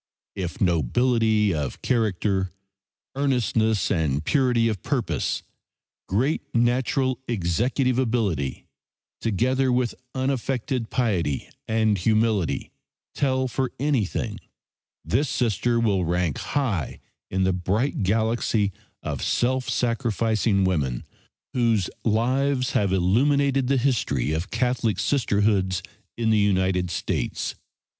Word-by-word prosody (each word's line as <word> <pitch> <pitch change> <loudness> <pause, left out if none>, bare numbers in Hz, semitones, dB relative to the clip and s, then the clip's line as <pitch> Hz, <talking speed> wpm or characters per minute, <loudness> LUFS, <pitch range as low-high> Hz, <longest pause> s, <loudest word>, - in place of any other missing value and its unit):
If 90 -3 -4
nobility 105 - +2
of 75 -4 -4
character, 100 -5 +1 0.6
earnestness 120 -6 +1
and 80 -5 0
purity 125 -5 +3
of 105 -5 -2
purpose, - - -1 0.7
great 125 +11 +1
natural 125 +2 +1
executive 120 - 0
ability, 105 - -1 0.6
together 130 +5 +1
with 125 -1 +1 0.2
unaffected 130 -2 -1
piety 90 - -1 0.2
and 110 -2 +2
humility 110 -1 +1 0.4
tell 130 -2 +1
for 130 0 -2
anything, 135 -8 -1 0.7
this 130 - +1
Sister 120 0 +1
will 100 -5 +2
rank 85 -2 0
high 110 - -2 0.3
in 95 0 0
the 95 0 +2
bright 100 +9 -1
galaxy 110 0 +1 0.3
of - - -3
self 130 +1 0
sacrificing 115 -4 +1
women 75 -10 0 0.5
whose 115 -6 +1
lives 130 +4 +1
have 100 -2 +1
illumined 135 +10 +3
the 135 0 +1
history 115 - 0
of 80 +5 -2
Catholic 125 -5 0
Sistershoods 100 -8 +1 0.3
in 115 -1 +1
the 110 - +4
United 95 -3 +2
States. - - -2
110 Hz, 105 wpm, -24 LUFS, 95-125 Hz, 0.7 s, the